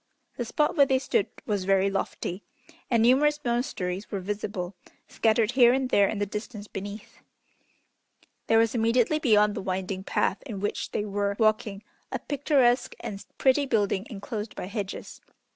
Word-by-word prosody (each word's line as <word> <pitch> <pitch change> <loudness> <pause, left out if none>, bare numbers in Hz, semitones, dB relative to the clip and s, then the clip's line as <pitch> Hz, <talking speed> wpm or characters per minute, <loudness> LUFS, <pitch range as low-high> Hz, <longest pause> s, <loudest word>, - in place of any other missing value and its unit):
The 240 - -2
spot 300 +6 +1
where 280 -3 +5
they 265 - +3
stood 260 -6 0 0.2
was 205 -3 -1
very 195 0 +3
lofty, 195 -1 -3 0.5
and 230 -2 +3
numerous 295 +5 +4
monasteries 210 -6 -2
were 200 - -3
visible, 200 -1 -4 0.3
scattered 220 0 +2
here 245 -2 +6
and 260 -1 -1
there 200 -1 +5
in 215 - -3
the 205 - 0
distance 210 +1 -6
beneath. 205 +2 -8 1.3
There 225 - +4
was 225 0 +3
immediately 235 +5 +2
beyond 210 -7 +4
the - - -4
winding 190 0 -3
path 190 - 0
in 210 -6 -5
which 205 +1 -2
they 210 - -2
were 200 0 -1
walking 215 -2 +1 0.3
a - - -1
picturesque 265 -4 +1
and 200 -1 -6
pretty 275 +1 +3
building 205 -3 0
enclosed 210 0 -6
by - - -5
hedges. 200 0 -6
215 Hz, 160 wpm, -27 LUFS, 200-245 Hz, 1.3 s, here